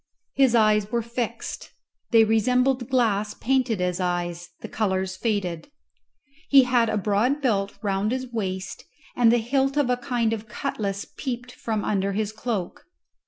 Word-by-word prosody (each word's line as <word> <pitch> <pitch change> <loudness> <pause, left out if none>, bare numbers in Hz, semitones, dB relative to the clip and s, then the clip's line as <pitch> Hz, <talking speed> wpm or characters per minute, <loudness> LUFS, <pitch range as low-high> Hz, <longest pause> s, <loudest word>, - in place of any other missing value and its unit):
His 265 -3 +4
eyes 215 -2 +3
were 235 -1 0
fixed; 235 0 -5 0.4
they 225 -2 +6
resembled 250 +3 +2
glass 215 -5 +1
painted 250 -4 0
as 180 0 -1
eyes, 175 -1 -2
the - - -6
colours 190 -3 -1
faded. 185 - -2 0.8
He 275 -2 +8
had 245 -2 +2
a 215 - 0
broad 215 +8 +1
belt 205 -8 0
round 200 +1 0
his 260 0 -2
waist, 190 -4 -4 0.3
and 235 -2 +5
the 240 - +4
hilt 270 +4 0
of 280 -4 +2
a 250 - +1
kind 240 -2 0
of 220 0 -5
cutlass 205 -4 -3
peeped 250 -2 -4
from 220 -3 -3
under 200 -1 0
his 210 +1 -1
cloak. 215 -4 -4
220 Hz, 155 wpm, -24 LUFS, 200-245 Hz, 0.8 s, He